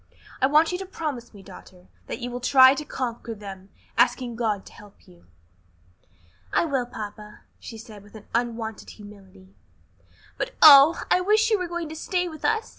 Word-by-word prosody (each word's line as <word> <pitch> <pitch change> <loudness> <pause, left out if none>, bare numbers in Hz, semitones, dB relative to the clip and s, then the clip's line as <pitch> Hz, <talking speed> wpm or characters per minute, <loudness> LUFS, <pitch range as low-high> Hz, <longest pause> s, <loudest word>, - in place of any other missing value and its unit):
I 260 - +4
want 305 +4 +3
you 360 - -3
to 385 - -6
promise 295 -10 -6
me, 200 -3 -15
daughter, 185 -1 -15 0.2
that - - -5
you 245 -1 -6
will 245 - -5
try 260 +1 +6
to 300 - -5
conquer 235 -4 -5
them, 195 -2 -11 0.3
asking 245 -3 +1
God 215 -4 -2
to - - -15
help 205 -1 -18
you." 85 0 -21 1.2
"I - - +1
will, 270 -6 -2
papa," 210 -2 -9 0.2
she 225 - -10
said, 215 -2 -12
with 205 +2 -15 0.2
unwonted 230 -2 -3
humility; 195 -2 -16 0.9
"but, - - -4
oh, 295 +2 +8
I 365 - +4
wish 430 +4 +2
you 430 - +2
were 365 - -3
going 345 -1 -5
to 315 - -8
stay 360 +3 -2
with 315 -3 -10
us! 440 0 0
240 Hz, 180 wpm, -24 LUFS, 210-315 Hz, 1.2 s, oh